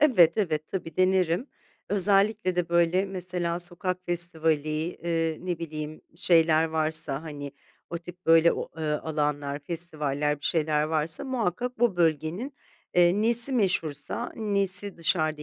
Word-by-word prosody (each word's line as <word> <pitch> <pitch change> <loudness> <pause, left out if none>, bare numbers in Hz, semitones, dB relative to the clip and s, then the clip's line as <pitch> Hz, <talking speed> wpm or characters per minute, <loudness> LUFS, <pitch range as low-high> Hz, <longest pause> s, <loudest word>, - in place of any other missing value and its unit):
Evet, 210 - +5
evet. 155 -6 0
Tabii, 165 -5 -6
denerim. 185 - +2 0.4
Özellikle 200 -1 +2
de, 175 -2 0
böyle, 170 +2 +2
mesela 180 -2 -3
sokak 180 +1 -2
festivali, 165 -3 0 0.3
eee, 165 -2 -2
ne 175 -2 -3
bileyim, 155 -1 -6 0.2
şeyler 165 -2 +4
varsa, 155 -2 -1
hani, 145 -3 -7 0.4
o 170 - -3
tip 175 +1 -13
böyle 165 +1 +6
o, - - -4
ııı, 150 -1 -2
alanlar, 145 -2 -2
festivaller, 150 -3 -2
bir - - -12
şeyler 155 -2 +1
varsa 155 - -1
muhakkak 245 -1 -2
bu 235 -6 +2
bölgenin, 170 - 0 0.4
eee, 180 +4 +4
nesi 235 +3 +5
meşhursa, 180 - -1
nesi 200 -2 0
dışarıda 155 -2 0
170 Hz, 130 wpm, -26 LUFS, 155-185 Hz, 0.4 s, böyle